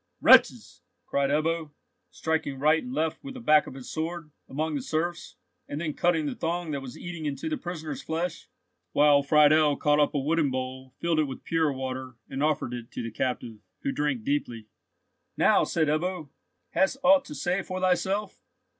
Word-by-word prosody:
"Wretches!" -, -, +5 dB, 0.2 s
cried 140 Hz, -1 st, 0 dB
Ebbo, 160 Hz, +2 st, 0 dB, 0.4 s
striking 160 Hz, -4 st, -2 dB
right 155 Hz, +4 st, +3 dB
and 250 Hz, -, -8 dB
left 160 Hz, -9 st, -2 dB
with 275 Hz, -1 st, -8 dB
the -, -, -7 dB
back 155 Hz, -10 st, +4 dB
of -, -, -9 dB
his 130 Hz, -2 st, -9 dB
sword, 160 Hz, 0 st, -4 dB, 0.2 s
among 155 Hz, +3 st, -2 dB
the 145 Hz, -, -2 dB
serfs, 170 Hz, +5 st, -3 dB, 0.3 s
and 145 Hz, -, -5 dB
then 155 Hz, -2 st, -2 dB
cutting 165 Hz, -2 st, +1 dB
the -, -, -2 dB
thong 170 Hz, 0 st, -3 dB
that 140 Hz, -2 st, -3 dB
was 130 Hz, -2 st, -9 dB
eating 170 Hz, -3 st, -5 dB
into 145 Hz, -, -4 dB
the 315 Hz, -, -1 dB
prisoner's 160 Hz, -, -6 dB
flesh, 165 Hz, +1 st, -4 dB, 0.4 s
while 145 Hz, -1 st, +5 dB
Friedel 150 Hz, +1 st, +5 dB
caught 150 Hz, 0 st, +2 dB
up 145 Hz, 0 st, +2 dB
a -, -, +2 dB
wooden 155 Hz, +1 st, +1 dB
bowl, 130 Hz, 0 st, -5 dB
filled 170 Hz, -2 st, 0 dB
it 155 Hz, -, +3 dB
with 135 Hz, -2 st, -8 dB
pure 160 Hz, -3 st, +1 dB
water, 130 Hz, -1 st, -5 dB
and 135 Hz, -, -5 dB
offered 150 Hz, -5 st, 0 dB
it 120 Hz, -1 st, -7 dB
to -, -, -4 dB
the 115 Hz, -, -5 dB
captive, 120 Hz, -2 st, -3 dB, 0.2 s
who 140 Hz, -, 0 dB
drank 145 Hz, -6 st, -1 dB
deeply. 120 Hz, -5 st, -2 dB, 0.7 s
"Now," -, -, +4 dB
said 160 Hz, -2 st, 0 dB
Ebbo, 160 Hz, +1 st, -1 dB, 0.4 s
"hast 190 Hz, +7 st, +2 dB
ought 280 Hz, +1 st, +6 dB
to -, -, -8 dB
say 175 Hz, +7 st, 0 dB
for 185 Hz, -1 st, -5 dB
thyself?" 190 Hz, +2 st, 0 dB
155 Hz, 185 wpm, -27 LUFS, 140-170 Hz, 0.7 s, ought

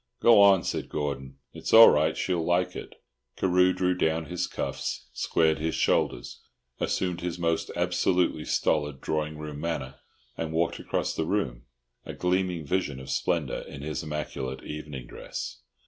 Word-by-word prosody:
"Go 115 Hz, -3 st, +7 dB
on," 100 Hz, -3 st, +6 dB
said -, -, -3 dB
Gordon, 70 Hz, -2 st, -4 dB, 0.2 s
"it's -, -, -5 dB
all 115 Hz, 0 st, +11 dB
right. 75 Hz, +2 st, +2 dB
She'll 90 Hz, -3 st, 0 dB
like 85 Hz, +2 st, +1 dB
it." -, -, -8 dB, 0.4 s
Carew 90 Hz, 0 st, +4 dB
drew 90 Hz, 0 st, +1 dB
down 80 Hz, -2 st, 0 dB
his 90 Hz, +3 st, -2 dB
cuffs, -, -, -4 dB
squared 80 Hz, -1 st, +1 dB
his 80 Hz, +1 st, -1 dB
shoulders, -, -, 0 dB, 0.4 s
assumed 90 Hz, -2 st, -1 dB
his 90 Hz, -1 st, -3 dB
most 85 Hz, -1 st, 0 dB
absolutely 90 Hz, +1 st, +1 dB
stolid 75 Hz, -2 st, 0 dB
drawing 75 Hz, +1 st, -2 dB
room 75 Hz, -1 st, -7 dB
manner, 75 Hz, -5 st, -4 dB, 0.4 s
and 80 Hz, -1 st, -4 dB
walked 85 Hz, +1 st, 0 dB
across -, -, -2 dB
the -, -, -1 dB
room, -, -, -1 dB, 0.4 s
a -, -, -7 dB
gleaming 90 Hz, -2 st, 0 dB
vision 75 Hz, -4 st, -1 dB
of 65 Hz, -, -7 dB
splendour -, -, 0 dB
in 70 Hz, -, -9 dB
his 75 Hz, 0 st, -3 dB
immaculate 75 Hz, -4 st, -5 dB
evening 75 Hz, -4 st, -7 dB
dress. 60 Hz, -, -7 dB
80 Hz, 155 wpm, -27 LUFS, 75-90 Hz, 0.4 s, all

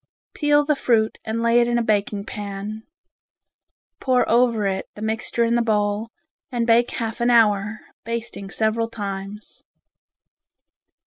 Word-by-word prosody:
Peel 295 Hz, -1 st, +3 dB
the 300 Hz, 0 st, +2 dB
fruit 225 Hz, -5 st, +1 dB
and 225 Hz, +1 st, -2 dB
lay 235 Hz, +1 st, +4 dB
it 240 Hz, -, +3 dB
in 240 Hz, 0 st, +1 dB
a 235 Hz, -, +1 dB
baking 205 Hz, -1 st, 0 dB
pan. 205 Hz, +1 st, -6 dB, 1.2 s
Pour 255 Hz, -2 st, +2 dB
over 235 Hz, -2 st, +3 dB
it 190 Hz, -1 st, -2 dB
the 210 Hz, -, -10 dB
mixture 220 Hz, +2 st, -1 dB
in 230 Hz, 0 st, +1 dB
the 240 Hz, -, +3 dB
bowl, 210 Hz, 0 st, 0 dB, 0.4 s
and 240 Hz, -2 st, 0 dB
bake 235 Hz, +1 st, +4 dB
half 225 Hz, -1 st, -4 dB
an 240 Hz, -, +3 dB
hour, 215 Hz, -2 st, +3 dB, 0.2 s
basting 230 Hz, -4 st, -5 dB
several 225 Hz, +2 st, 0 dB
times. 200 Hz, -1 st, -7 dB
225 Hz, 140 wpm, -22 LUFS, 210-235 Hz, 1.2 s, lay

